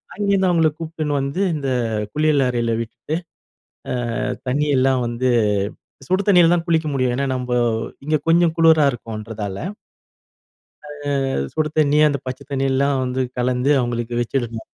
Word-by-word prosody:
அங்கேருந்து 200 -2 +2
அவங்கள 165 -3 +3
கூப்ட்டுன்னு 155 -2 -3
வந்து 140 +7 -2
இந்த 140 -3 -3 0.4
குளியல் 150 -2 +2
அறையில 120 -1 0
விட்டுட்டு, 120 +6 -5 1.0
அ - - -2 0.3
தண்ணியெல்லாம் 135 -2 +2
வந்து 120 +2 0 0.8
சுடு 185 +2 +2
தண்ணில 175 -4 +6
தான் 170 -1 -1
குளிக்க 160 -2 +2
முடியும். 130 -2 +1
ஏன்னா, 140 +1 0
நம்ம 125 -1 -1 0.5
இங்க 155 0 +2
கொஞ்சம் 165 0 +4
குளிரா 160 -2 +5
இருக்கும்ன்றதால. 110 -4 -6 1.3
அ - - -10 0.5
அது 70 - -1
சுடு 155 -1 0
தண்ணி, 150 -1 +3
அந்த 140 -1 -1
பச்சதண்ணியெல்லாம் 135 +1 -1
வந்து 130 +1 -2 0.2
கலந்து 125 +2 +1
அவங்களுக்கு 120 -1 -2
வெச்சுடணும். 115 -2 -3
135 Hz, 130 wpm, -21 LUFS, 125-155 Hz, 1.3 s, தண்ணில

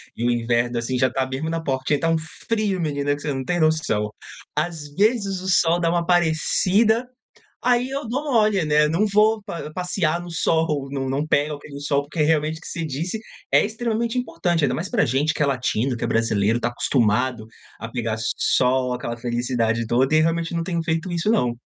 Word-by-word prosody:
e 120 - -2
o 120 - +3
inverno, 120 0 0
assim, 120 +2 -1
já 130 0 +3
está 130 +1 -1
mesmo 135 +5 -3
na 165 0 -2
porta, 130 -3 -2
que 145 - +3
tá 165 - 0
um 165 - +3 0.3
frio 215 -4 0
menina, 145 -3 0
que 145 - -6
você 145 - -2
não 135 0 -3
tem 175 +5 -1
noção. 155 -10 +1 0.5
Às 160 -4 -2
vezes 200 -2 +1
o 190 - -4
sol 175 -1 +3
dá 165 - +2
uma 170 +1 +2
aparecida, 185 +7 +2 0.6
aí 245 0 +3
eu 275 0 -4
dou 260 +6 -2
mole, 215 -5 +3
né, 150 0 +4
não 175 +8 +2
vou 215 +2 +3
pa 170 -6 -6
passear 175 -2 -1
no 175 0 -8
sol, 160 -4 0
não 135 -1 -3
não 140 +3 -1
pego 150 0 +1
aquele 145 -1 -10
sol, 145 -1 +1
porque 150 +3 -6
realmente 155 +1 +2
o - - -20
que - - -11
você 165 -2 -4
disse 160 +9 -3 0.3
é - - +5
extremamente 230 +2 -2
importante, 175 -9 0
ainda 125 -2 +1
mais - - -4
pra - - +2
gente 140 +6 +1
que - - -2
é - - +3
latino, 125 -1 0
que - - -10
é - - +1
brasileiro, 115 0 +1
está 120 +1 0
acostumado 120 -1 0 0.3
a 115 - -5
pegar 115 -2 -2 0.2
sol, 125 0 +2
aquela 120 -1 -4
felicidade 120 -1 -1
toda, 130 +6 +2
e 155 - +6
realmente 165 +1 0
não 170 - 0
tenho 170 -2 -2
feito 160 +2 -2
isso 175 +5 0
não. 125 - +2
155 Hz, 210 wpm, -22 LUFS, 130-175 Hz, 0.6 s, e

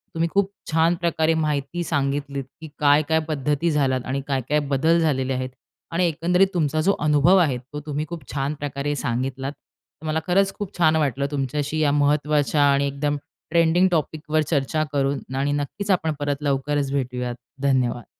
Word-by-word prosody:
तुम्ही 165 +1 +1
खूप 200 0 +2 0.2
छान 165 +2 +3
प्रकारे 165 -1 +1
माहिती 155 +1 -1
सांगितलीत 140 -2 -1 0.2
की 160 - -7
काय-काय 150 +2 +4
पद्धती 150 +2 0
झाल्यात 135 -4 +1
आणि 135 +1 -2
काय-काय 140 +1 0
बदल 160 +5 +3
झालेले 135 -5 +1
आहेत. 130 0 -2 0.4
आणि 175 +2 +2
एकंदरीत 175 +4 +2
तुमचा 155 -3 +1
जो 195 +5 +3
अनुभव 150 +5 +5
आहे, 150 -8 +3
तो 130 +4 -9
तुम्ही 150 0 -2
खूप 170 -4 -6
छान 140 +1 -1
प्रकारे 145 0 -2
सांगितलात. 130 +2 -2 0.5
तर - - -10
मला 155 +1 +1
खरंच 195 +2 +3
खूप 205 -2 -6
छान 160 -2 +4
वाटलं, 140 -3 0
तुमच्याशी 145 +2 -2
या 150 -2 +3
महत्त्वाच्या 145 0 +2
आणि 140 0 +2
एकदम 145 +1 -1 0.3
ट्रेंडिंग 170 +2 +4
टॉपिकवर 155 -1 0
चर्चा 150 0 0
करून 135 -2 -1
आणि 140 +2 0
नक्कीच 145 +8 -2
आपण 160 -4 +1
परत 145 -1 0
लवकरच 140 0 0
भेटूयात, 125 -3 -2 0.3
धन्यवाद. 130 -3 +1
145 Hz, 160 wpm, -23 LUFS, 140-160 Hz, 0.5 s, अनुभव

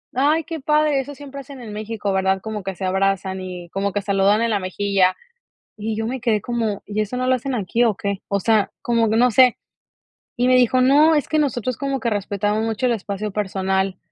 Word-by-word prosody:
"Ay 300 +5 +2
qué 330 0 -6
padre 300 0 +2
eso 285 +2 -5
siempre 280 0 -9
hacen 275 -1 -11
en 225 -3 -8
México, 210 -1 -3
¿verdad?, 190 0 +1
como 215 -1 -5
que 195 0 -4
se 190 - -8
abrazan 190 0 0
y 180 -2 -7
como 195 +2 -2
que 205 - -1
saludan 200 +2 +2
en 230 - +1
la 210 - +1
mejilla," 185 0 +1 0.6
y 215 +1 -3
yo 220 0 -2
me 255 +1 -4
quedé 225 -3 +2
como: 225 -3 -2
"¿Y 210 +1 -2
eso 215 +4 -3
no 255 0 -1
lo 255 - +4
hacen 260 +2 -4
aquí 230 +1 0
o 225 -4 +2
qué?" 200 0 -3
O 200 - +1
sea, 215 +1 +2
como 230 -2 +1
que 220 - +1
no 250 +2 +5
sé. 250 +1 +5 0.8
Y 245 - +1
me 255 - +5
dijo: 255 0 +4
"No, 290 +5 +5
es 295 - 0
que 310 - 0
nosotros 255 -4 -1
como 275 -1 -2
que 235 - -1
respetamos 205 +1 -1
mucho 225 +3 -1
el 240 - +2
espacio 205 -1 -4
personal." 190 -1 -1
220 Hz, 225 wpm, -21 LUFS, 195-255 Hz, 0.8 s, no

